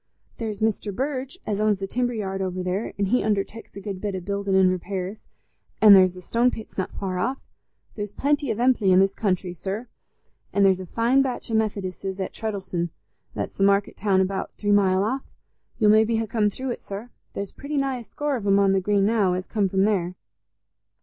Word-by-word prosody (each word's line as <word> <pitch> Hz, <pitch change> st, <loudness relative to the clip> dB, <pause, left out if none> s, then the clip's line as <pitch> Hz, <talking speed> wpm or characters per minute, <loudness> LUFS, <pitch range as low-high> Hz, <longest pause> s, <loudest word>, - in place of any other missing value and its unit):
There's 220 Hz, -2 st, -3 dB
Mester 220 Hz, -1 st, 0 dB
Burge 270 Hz, -, -3 dB
as 210 Hz, -1 st, -1 dB
owns 215 Hz, -1 st, +3 dB
the 195 Hz, -, -4 dB
timber 245 Hz, +4 st, -1 dB
yard 195 Hz, -3 st, -3 dB
over 185 Hz, -1 st, -2 dB
there, 185 Hz, +4 st, -2 dB
he 200 Hz, +5 st, +2 dB
underteks 210 Hz, +1 st, -2 dB
a -, -, -6 dB
good 195 Hz, -1 st, -6 dB
bit 205 Hz, -2 st, -2 dB
o' -, -, -2 dB
building 200 Hz, +1 st, -1 dB
an' 190 Hz, -1 st, +5 dB
repairs. 185 Hz, +2 st, -4 dB, 0.5 s
An' 215 Hz, -2 st, +9 dB
there's 185 Hz, -2 st, +6 dB
the 180 Hz, -, -10 dB
stone 235 Hz, +6 st, +2 dB
pits 220 Hz, -3 st, -8 dB
not 190 Hz, -, -2 dB
far 185 Hz, -2 st, -3 dB
off. 255 Hz, +8 st, 0 dB, 0.6 s
There's 205 Hz, -2 st, -5 dB
plenty 285 Hz, +2 st, 0 dB
of 220 Hz, -, -1 dB
emply 235 Hz, -5 st, +3 dB
i' 185 Hz, -, +6 dB
this 195 Hz, +1 st, +4 dB
countryside, 185 Hz, -3 st, -1 dB
sir. 205 Hz, +5 st, -3 dB, 0.7 s
An' 200 Hz, -, +3 dB
there's 190 Hz, -1 st, +4 dB
a 185 Hz, -, -7 dB
fine 240 Hz, +7 st, +3 dB
batch 255 Hz, -3 st, -3 dB
o' -, -, -2 dB
Methodisses 195 Hz, -3 st, -2 dB
at 190 Hz, -, -3 dB
Treddles'on—that's 190 Hz, -6 st, -5 dB
the 195 Hz, -, 0 dB
market 200 Hz, 0 st, +3 dB
town 195 Hz, -3 st, +2 dB
about 190 Hz, +1 st, -2 dB
three 205 Hz, -1 st, 0 dB
mile 195 Hz, -2 st, +4 dB
off—you'll 220 Hz, -2 st, -2 dB
maybe 220 Hz, +1 st, +4 dB
ha' 225 Hz, 0 st, -1 dB
come 210 Hz, -1 st, +1 dB
through 260 Hz, +5 st, -4 dB
it, -, -, -5 dB
sir. 205 Hz, +5 st, -7 dB, 0.2 s
There's 200 Hz, -1 st, -4 dB
pretty 290 Hz, +1 st, -5 dB
nigh 270 Hz, -2 st, 0 dB
a -, -, -9 dB
score 290 Hz, +4 st, -2 dB
of 215 Hz, -5 st, -4 dB
'em 200 Hz, 0 st, +5 dB
on 200 Hz, -1 st, +4 dB
the 195 Hz, 0 st, +2 dB
Green 200 Hz, +1 st, +2 dB
now, 205 Hz, -4 st, +2 dB
as 185 Hz, +1 st, -3 dB
come 205 Hz, -3 st, 0 dB
from 190 Hz, +1 st, +2 dB
there. 185 Hz, -4 st, +1 dB
200 Hz, 205 wpm, -24 LUFS, 190-225 Hz, 0.7 s, An